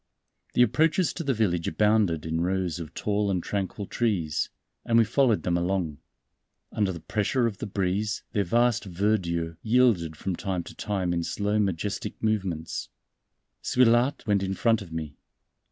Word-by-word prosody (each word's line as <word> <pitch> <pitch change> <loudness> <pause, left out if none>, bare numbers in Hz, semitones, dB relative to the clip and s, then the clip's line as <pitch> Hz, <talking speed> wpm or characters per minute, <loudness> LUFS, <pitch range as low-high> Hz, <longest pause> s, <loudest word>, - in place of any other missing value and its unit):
The 125 - +6
approaches 160 - +2
to 165 - -4
the 135 -4 0
village 90 -6 0
abounded 105 -4 +2
in 80 +1 -1
rows 90 -2 -1
of 80 -3 -7
tall 105 -1 0
and 90 -3 0
tranquil 100 0 -3
trees, 95 -10 -1 0.3
and 115 -1 +2
we 115 - +7
followed 120 0 +2
them 90 - +1
along. 85 -4 -1 0.7
Under 100 -3 0
the 85 -3 -7
pressure 110 +7 0
of 110 -4 -2
the - - -4
breeze 100 +2 -1
their 100 - +1
vast 120 +4 +2
verdure 85 -4 -1
yielded 110 -9 +3
from 95 +4 -3
time 95 -1 -3
to - - -10
time 95 -4 -2
in 85 -1 -1
slow 105 +4 -1
majestic 100 +1 -2
movements. 95 -7 -2 0.7
Suilhard 125 +2 +3
went 105 -2 +2
in 95 0 -2
front 115 0 +2
of 90 -5 -10
me. 80 -3 -5
100 Hz, 160 wpm, -27 LUFS, 85-110 Hz, 0.7 s, we